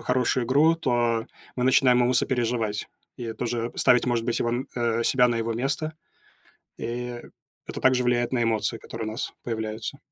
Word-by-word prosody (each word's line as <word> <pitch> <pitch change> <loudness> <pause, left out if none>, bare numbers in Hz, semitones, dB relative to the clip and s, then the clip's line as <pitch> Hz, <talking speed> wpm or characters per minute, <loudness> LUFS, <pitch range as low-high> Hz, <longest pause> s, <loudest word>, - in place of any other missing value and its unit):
хорошую 125 0 +1
игру, 145 +7 +4
то 120 -6 0 0.3
мы 125 - 0
начинаем 130 -1 +5
ему 125 +1 +2
сопереживать 115 -4 0 0.3
и 115 -2 -5
тоже 115 +1 -3
ставить, 125 - +4
может 120 -2 0
быть, 120 - 0
его 120 - 0 0.2
э, 115 -1 0
себя 125 -2 +4
на 120 - 0
его 115 0 -1
место. 145 +6 -2 0.9
И 120 0 -4 0.5
это - - -6
также 130 -1 +4
влияет 120 0 +1
на 125 -2 +1
эмоции, 110 -1 0
которые 115 0 -6
у 110 - -3
нас 110 - -4
появляются. 110 +2 -4
120 Hz, 165 wpm, -25 LUFS, 115-125 Hz, 0.9 s, начинаем